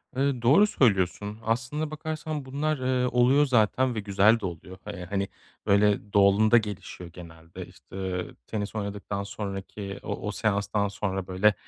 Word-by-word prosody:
Iıı, 135 Hz, -2 st, 0 dB
doğru 145 Hz, -, +6 dB
söylüyorsun, 105 Hz, -, +1 dB
aslında 130 Hz, +7 st, -1 dB
bakarsan 155 Hz, -1 st, -4 dB
bunlar, 145 Hz, +3 st, -1 dB
ııı, 125 Hz, -1 st, 0 dB
oluyor 130 Hz, +4 st, +4 dB
zaten 125 Hz, 0 st, +2 dB
ve -, -, -1 dB
güzel 105 Hz, +3 st, +4 dB
de 105 Hz, -, -5 dB
oluyor. 90 Hz, +2 st, -7 dB
Iıı, 95 Hz, -3 st, -6 dB
hani, 100 Hz, 0 st, -2 dB, 0.4 s
böyle, 100 Hz, 0 st, +2 dB
doğalında 100 Hz, +3 st, +5 dB
gelişiyor 100 Hz, -4 st, -5 dB
genelde, 85 Hz, -1 st, -10 dB
işte, -, -, -16 dB
eee, 90 Hz, -2 st, -4 dB
tenis 105 Hz, -1 st, -4 dB
oynadıktan 100 Hz, -1 st, -4 dB
sonraki 100 Hz, 0 st, -6 dB
o -, -, -4 dB
o 105 Hz, -, -1 dB
seanstan 105 Hz, -1 st, 0 dB
sonra, 95 Hz, -2 st, -3 dB
böyle, 95 Hz, +3 st, +3 dB
105 Hz, 150 wpm, -27 LUFS, 100-125 Hz, 0.4 s, doğru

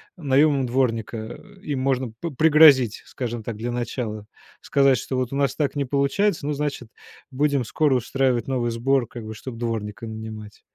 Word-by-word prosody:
наёмом 140 Hz, -3 st, +2 dB
дворника. 120 Hz, -3 st, -1 dB
Э, 190 Hz, -, -10 dB
им 145 Hz, -7 st, -3 dB
можно 130 Hz, -3 st, 0 dB
п 170 Hz, -2 st, -3 dB
пригрозить, 145 Hz, -5 st, +5 dB
скажем 120 Hz, -3 st, -5 dB
так, 110 Hz, -2 st, -5 dB
для 120 Hz, +2 st, -3 dB
начала. 120 Hz, -3 st, -4 dB, 0.4 s
Сказать, 135 Hz, -2 st, +3 dB
что 130 Hz, +4 st, -4 dB
вот 130 Hz, 0 st, -2 dB
у -, -, -2 dB
нас 140 Hz, -2 st, +1 dB
так 145 Hz, -2 st, -1 dB
не 145 Hz, -, 0 dB
получается, 140 Hz, +6 st, 0 dB
ну, 150 Hz, -, -1 dB
значит, 140 Hz, -5 st, -3 dB, 0.4 s
будем 140 Hz, -2 st, +1 dB
скоро 145 Hz, +3 st, +1 dB
устраивать 125 Hz, -1 st, 0 dB
новый 125 Hz, -3 st, -1 dB
сбор, 120 Hz, +1 st, +1 dB
как 120 Hz, -2 st, -9 dB
бы, 110 Hz, -, -6 dB
чтоб 115 Hz, +2 st, -8 dB
дворника 115 Hz, -1 st, -4 dB
нанимать. 110 Hz, -1 st, -8 dB
130 Hz, 175 wpm, -23 LUFS, 115-140 Hz, 0.4 s, пригрозить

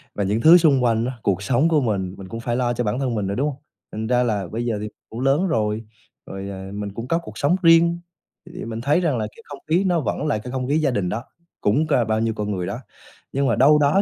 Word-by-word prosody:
và 100 Hz, -, -1 dB
những 105 Hz, +4 st, 0 dB
thứ 165 Hz, +5 st, +9 dB
xung 145 Hz, -7 st, +3 dB
quanh 115 Hz, -1 st, +2 dB
á, 130 Hz, -, -3 dB
cuộc 100 Hz, 0 st, 0 dB
sống 130 Hz, +10 st, +2 dB
của 155 Hz, -3 st, +3 dB
mình, 95 Hz, -6 st, -2 dB
mình 95 Hz, -, -9 dB
cũng 115 Hz, -, -6 dB
phải 120 Hz, 0 st, -2 dB
lo 120 Hz, -1 st, 0 dB
cho 120 Hz, -, -1 dB
bản 105 Hz, +4 st, -1 dB
thân 130 Hz, -4 st, -1 dB
mình 105 Hz, -3 st, -1 dB
nữa, 100 Hz, -, -2 dB
đúng 145 Hz, +3 st, 0 dB
hông? 140 Hz, 0 st, -9 dB, 0.3 s
Thành 110 Hz, +1 st, -4 dB
ra 125 Hz, +1 st, +3 dB
là 105 Hz, -6 st, -1 dB
bây 115 Hz, +6 st, -4 dB
giờ 115 Hz, -3 st, -1 dB
thì 105 Hz, -, -4 dB, 0.2 s
cũng 115 Hz, -, -7 dB
lớn 140 Hz, +8 st, +2 dB
rồi, 110 Hz, -7 st, 0 dB, 0.4 s
rồi, 95 Hz, 0 st, -7 dB
ờ, 95 Hz, 0 st, -7 dB
mình 100 Hz, -1 st, -5 dB
cũng 115 Hz, +3 st, -6 dB
có 165 Hz, -, +1 dB
cuộc 110 Hz, -7 st, -10 dB
sống 145 Hz, +7 st, +2 dB
riêng, 170 Hz, +1 st, +5 dB, 0.5 s
thì 180 Hz, +1 st, -8 dB
mình 115 Hz, 0 st, -5 dB
thấy 145 Hz, +7 st, +2 dB
rằng 155 Hz, -8 st, +1 dB
là 110 Hz, -1 st, -2 dB
cái -, -, -15 dB
không 145 Hz, -1 st, -9 dB
khí 175 Hz, +5 st, +3 dB
nó 175 Hz, -3 st, +2 dB
vẫn 150 Hz, -, -2 dB
là 125 Hz, -, +1 dB
cái 125 Hz, +3 st, -8 dB
không 130 Hz, -1 st, -3 dB
khí 145 Hz, -, +2 dB
gia 150 Hz, -4 st, +1 dB
đình 100 Hz, -7 st, -1 dB
đó, 115 Hz, +5 st, -3 dB, 0.4 s
cũng 145 Hz, +10 st, +2 dB
cà 120 Hz, -, +3 dB
bao 110 Hz, -1 st, 0 dB
nhiêu 115 Hz, -1 st, 0 dB
con 105 Hz, -1 st, -3 dB
người 90 Hz, -3 st, -3 dB
đó, 100 Hz, +4 st, -4 dB, 0.5 s
nhưng 140 Hz, 0 st, 0 dB
mà 115 Hz, -, +2 dB
đâu 150 Hz, +5 st, +5 dB
đó 150 Hz, +6 st, +4 dB
120 Hz, 285 wpm, -22 LUFS, 105-145 Hz, 0.5 s, thứ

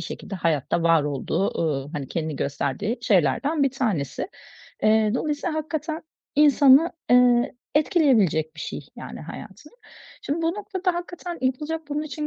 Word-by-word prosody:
şekilde 200 Hz, -, -7 dB
hayatta 165 Hz, -2 st, 0 dB
var 165 Hz, -2 st, +4 dB
olduğu, 150 Hz, +6 st, -1 dB
ııı, 145 Hz, -4 st, -1 dB
hani, 140 Hz, -3 st, -5 dB
kendini 155 Hz, -3 st, -3 dB
gösterdiği 140 Hz, -, -2 dB
şeylerden 230 Hz, -, +2 dB
bir 275 Hz, -, +3 dB
tanesi. 215 Hz, -, -2 dB, 0.5 s
Eee, 215 Hz, 0 st, +4 dB
dolayısıyla 300 Hz, +4 st, -2 dB
hakikaten 315 Hz, +1 st, -3 dB, 0.3 s
insanı, 290 Hz, +1 st, +6 dB, 0.2 s
eee, 245 Hz, +1 st, +5 dB, 0.2 s
etkileyebilecek 225 Hz, -, +3 dB
bir 155 Hz, -, -10 dB
şey -, -, -5 dB, 0.2 s
yani -, -, -8 dB
hayatını. -, -, -10 dB, 0.5 s
Şimdi 315 Hz, +4 st, -2 dB
bu -, -, +1 dB
noktada 385 Hz, -3 st, -2 dB
hakikaten 350 Hz, 0 st, -6 dB
yapılacak 300 Hz, +5 st, -1 dB
bunun 295 Hz, +1 st, -2 dB
için 300 Hz, 0 st, -4 dB
255 Hz, 135 wpm, -24 LUFS, -, 0.5 s, insanı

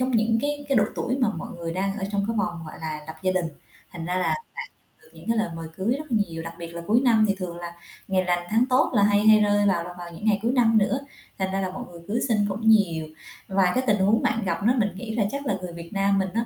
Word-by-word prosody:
có 255 Hz, -, +2 dB
những 225 Hz, -2 st, +2 dB
cái 290 Hz, 0 st, -2 dB
cái 275 Hz, -, +2 dB
độ 210 Hz, -, +5 dB
tuổi 255 Hz, -, -1 dB
mà 245 Hz, -4 st, +3 dB
mọi -, -, -6 dB
người 165 Hz, -1 st, -4 dB
đang 195 Hz, +3 st, -1 dB
ở 195 Hz, -, -2 dB
trong 200 Hz, 0 st, +1 dB
cái 230 Hz, -, -1 dB
vòng, 170 Hz, -5 st, -2 dB
gọi -, -, -9 dB
là, 155 Hz, -1 st, -4 dB
lập 160 Hz, -, -8 dB
gia 185 Hz, 0 st, +2 dB
đình, 180 Hz, -2 st, 0 dB, 0.5 s
thành 170 Hz, -2 st, -6 dB
ra 180 Hz, +1 st, -1 dB
là 185 Hz, -, +1 dB
bạn 465 Hz, -, -1 dB, 0.6 s
được -, -, -20 dB
những 165 Hz, +5 st, -13 dB
cái 230 Hz, -, +2 dB
lời 220 Hz, -4 st, +1 dB
mời 165 Hz, -1 st, -6 dB
cưới 220 Hz, +7 st, 0 dB
rất 305 Hz, -4 st, -9 dB
là 225 Hz, -, +4 dB
nhiều, 165 Hz, 0 st, -5 dB
đặc 165 Hz, 0 st, -7 dB
biệt 170 Hz, -, -5 dB
là 170 Hz, 0 st, -7 dB
cuối 235 Hz, +4 st, +4 dB
năm 225 Hz, -4 st, +4 dB
thì 200 Hz, -, +1 dB
thường 180 Hz, -2 st, -5 dB
là 170 Hz, 0 st, -7 dB, 0.3 s
ngày 190 Hz, -1 st, +2 dB
lành 175 Hz, -1 st, 0 dB
tháng 225 Hz, +3 st, +3 dB
tốt 255 Hz, +1 st, +3 dB
là 205 Hz, -3 st, +4 dB
hay 205 Hz, +1 st, +3 dB
hay 215 Hz, 0 st, +8 dB
rơi 205 Hz, -1 st, +3 dB
vào 175 Hz, -4 st, +2 dB
là 175 Hz, +1 st, -8 dB
vào 175 Hz, -1 st, -8 dB
những 210 Hz, -, -8 dB
ngày 210 Hz, -2 st, +3 dB
cuối 235 Hz, +2 st, +1 dB
năm 230 Hz, -4 st, +4 dB
nữa, 215 Hz, +6 st, +2 dB, 0.4 s
thành 190 Hz, 0 st, -1 dB
ra 195 Hz, -, -1 dB
là 185 Hz, -, -1 dB
mọi 185 Hz, -, -6 dB
người 170 Hz, -1 st, -11 dB
cưới 225 Hz, +4 st, 0 dB
xin 220 Hz, -, +3 dB
cũng 220 Hz, +3 st, +1 dB
nhiều. 170 Hz, -8 st, +3 dB, 0.4 s
Và 190 Hz, -2 st, +3 dB
cái 255 Hz, -, +2 dB
tình 210 Hz, -1 st, +4 dB
huống 205 Hz, +4 st, +3 dB
bạn 225 Hz, -1 st, 0 dB
gặp 170 Hz, +1 st, -1 dB
đó 240 Hz, +3 st, +4 dB
mình 205 Hz, -3 st, +2 dB
nghĩ 220 Hz, +1 st, -5 dB
là 220 Hz, -, +2 dB
chắc 280 Hz, 0 st, -4 dB
là 200 Hz, -, +1 dB
người 175 Hz, -2 st, -6 dB
Việt 170 Hz, +2 st, -9 dB
Nam 195 Hz, 0 st, +2 dB
mình 190 Hz, -1 st, 0 dB
á 230 Hz, +1 st, 0 dB
200 Hz, 300 wpm, -25 LUFS, 175-225 Hz, 0.6 s, hay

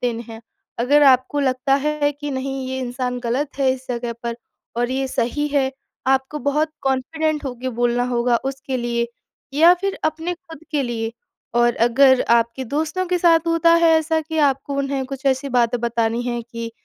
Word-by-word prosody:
देने 235 Hz, -2 st, -2 dB
हैं। 225 Hz, -1 st, -9 dB, 0.4 s
अगर 285 Hz, +5 st, +4 dB
आपको 265 Hz, +1 st, +4 dB
लगता 265 Hz, 0 st, +1 dB
है 300 Hz, -1 st, +1 dB
कि 290 Hz, +1 st, -6 dB
नहीं 270 Hz, 0 st, -3 dB
ये 260 Hz, 0 st, -3 dB
इंसान 250 Hz, 0 st, -3 dB
गलत 260 Hz, +5 st, -2 dB
है 270 Hz, -1 st, +3 dB
इस 260 Hz, 0 st, -8 dB
जगह 240 Hz, -1 st, -3 dB
पर 235 Hz, -1 st, -3 dB, 0.4 s
और 240 Hz, +1 st, 0 dB
ये 265 Hz, +1 st, -1 dB
सही 260 Hz, +4 st, -1 dB
है, 280 Hz, -2 st, +1 dB, 0.4 s
आपको 265 Hz, +2 st, +1 dB
बहुत 300 Hz, +3 st, 0 dB
कॉन्फिडेंट 300 Hz, +4 st, -1 dB
होके 255 Hz, -1 st, -4 dB
बोलना 240 Hz, 0 st, +2 dB
होगा 240 Hz, 0 st, +2 dB
उसके 270 Hz, -1 st, -5 dB
लिए 235 Hz, -1 st, -1 dB, 0.5 s
या 330 Hz, +4 st, +7 dB
फिर 395 Hz, 0 st, -2 dB
अपने 320 Hz, +3 st, -1 dB
खुद 325 Hz, -3 st, -13 dB
के 295 Hz, -3 st, 0 dB
लिए। 230 Hz, -2 st, -3 dB, 0.5 s
और 240 Hz, 0 st, +3 dB
अगर 260 Hz, +1 st, +5 dB, 0.2 s
आपके 235 Hz, +3 st, -2 dB
दोस्तों 315 Hz, +8 st, -2 dB
के 360 Hz, 0 st, 0 dB
साथ 330 Hz, -1 st, +4 dB
होता 330 Hz, 0 st, +4 dB
है 335 Hz, -1 st, +5 dB
ऐसा 320 Hz, 0 st, 0 dB
कि 320 Hz, +1 st, -5 dB
आपको 275 Hz, +1 st, -8 dB
उन्हें 275 Hz, -1 st, -1 dB
कुछ 270 Hz, +1 st, -8 dB
ऐसी 270 Hz, +1 st, +1 dB
बात 235 Hz, 0 st, +2 dB
बतानी 230 Hz, 0 st, 0 dB
हैं 240 Hz, -1 st, -3 dB
कि 230 Hz, -1 st, -7 dB
265 Hz, 180 wpm, -21 LUFS, 245-295 Hz, 0.5 s, या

